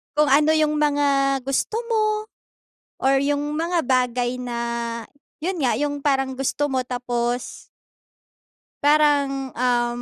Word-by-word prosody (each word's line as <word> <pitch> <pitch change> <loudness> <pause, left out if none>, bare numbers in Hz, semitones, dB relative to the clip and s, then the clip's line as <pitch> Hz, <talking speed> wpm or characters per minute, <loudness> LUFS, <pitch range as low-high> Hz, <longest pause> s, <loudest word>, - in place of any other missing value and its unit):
Kung 300 0 +3
ano 300 +3 +5
yung 305 -1 +2
mga 280 -2 +2
gusto 275 - -1 0.2
mo, 440 -1 +2 1.0
or 270 +1 +3
yung 290 +1 -1
mga 340 +1 0
bagay 250 -1 0
na 245 -1 -4 0.9
yun 365 0 -2
nga, 245 - +2
yung 290 0 -1
parang 270 -2 +1
gusto 290 +2 0
mo 260 - +1
tapos 245 -1 -3 1.1
parang, 285 -2 +2
um, 240 -1 0
275 Hz, 120 wpm, -22 LUFS, 250-295 Hz, 1.1 s, ano